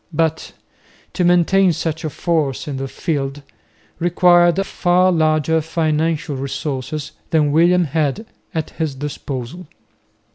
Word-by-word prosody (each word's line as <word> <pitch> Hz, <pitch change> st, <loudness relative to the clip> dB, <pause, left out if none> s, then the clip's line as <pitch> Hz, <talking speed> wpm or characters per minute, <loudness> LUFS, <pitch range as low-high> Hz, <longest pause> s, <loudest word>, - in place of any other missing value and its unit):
But 160 Hz, 0 st, -1 dB, 0.6 s
to 180 Hz, -, 0 dB
maintain 180 Hz, +1 st, +4 dB
such 160 Hz, +1 st, -3 dB
a 155 Hz, -, -2 dB
force 155 Hz, -3 st, -1 dB
in 140 Hz, -2 st, -4 dB
the 135 Hz, 0 st, -3 dB
field 140 Hz, -2 st, -3 dB, 0.6 s
required 175 Hz, 0 st, +4 dB
far 180 Hz, 0 st, +2 dB
larger 160 Hz, -1 st, +2 dB
financial 155 Hz, -1 st, -1 dB
resources 140 Hz, +2 st, -4 dB, 0.2 s
than 155 Hz, -3 st, +2 dB
William 175 Hz, +4 st, +4 dB
had 155 Hz, -, -1 dB, 0.3 s
at 160 Hz, -2 st, -3 dB
his 155 Hz, -4 st, -3 dB
disposal. 140 Hz, +3 st, -6 dB
160 Hz, 115 wpm, -19 LUFS, 145-175 Hz, 0.6 s, maintain